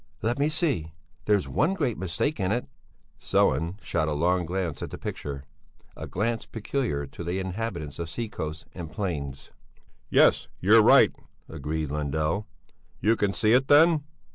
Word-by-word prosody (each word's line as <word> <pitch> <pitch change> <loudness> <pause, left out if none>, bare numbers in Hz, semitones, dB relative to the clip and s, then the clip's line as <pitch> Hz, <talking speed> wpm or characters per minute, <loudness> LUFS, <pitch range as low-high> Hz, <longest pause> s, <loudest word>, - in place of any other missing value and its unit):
"Let 120 +4 0
me 145 +2 +2
see! 145 - 0 0.3
There's 105 -3 +2
one 165 +8 +1
great 140 - 0
mistake 95 - -2
in 95 0 0
it." 120 +3 0 0.5
Sellén 85 +9 +1
shot 80 -3 0
a 75 - 0
long 90 +3 +1
glance 85 -5 -2
at - - -4
the - - -7
picture, 70 -1 -5 0.5
a - - -7
glance 115 +4 -2
peculiar 115 - -2
to 70 - -9
the 85 +2 -2
inhabitants 95 -6 -4
of 85 -1 -4
sea 115 +7 -3
coasts 80 -6 -6
and 85 -3 -7
plains. 70 -10 -4 0.6
"Yes, - - +4
you're - - +6
right," - - +6 0.3
agreed 75 -1 -4
Lundell. 75 +7 -1 0.5
"You 110 +2 +3
can 100 -3 +1
see 105 +3 +2
it 130 +2 +4
then?" 155 +1 +6
95 Hz, 160 wpm, -26 LUFS, 80-115 Hz, 0.6 s, you're